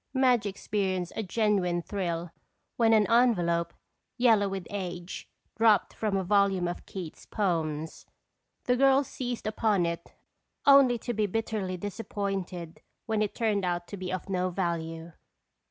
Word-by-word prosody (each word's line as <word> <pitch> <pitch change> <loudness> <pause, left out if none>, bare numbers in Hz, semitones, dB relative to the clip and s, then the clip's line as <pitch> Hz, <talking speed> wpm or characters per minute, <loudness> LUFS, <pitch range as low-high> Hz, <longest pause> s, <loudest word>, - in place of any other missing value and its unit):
Madge 250 -5 +3
experienced 190 -2 -2
a - - -1
genuine 195 -4 +1
thrill 175 -4 -3 0.4
when 230 -1 +3
an 215 -2 +5
envelope, 175 -9 +3 0.5
yellow 225 -5 +4
with 190 -2 -4
age, 180 -3 -5 0.3
dropped 220 -3 +4
from 210 -3 -1
a 190 - 0
volume 195 -2 +2
of 175 - -6
Keats' 180 -5 -8
poems. 160 -6 -2 0.6
The 250 - +2
girls 270 +1 +4
seized 245 -2 -5
upon 210 -4 +1
it 170 0 -4 0.5
only 275 -3 +7
to 240 +1 -4
be 215 -1 +1
bitterly 205 -3 -2
disappointed 195 -4 -4 0.2
when 220 -2 0
it 210 - -1
turned 215 -4 +1
out 175 -1 -1
to - - -5
be 185 -2 -5
of 185 +1 -4
no 185 -1 0
value. 170 -2 -3
195 Hz, 140 wpm, -28 LUFS, 175-220 Hz, 0.6 s, only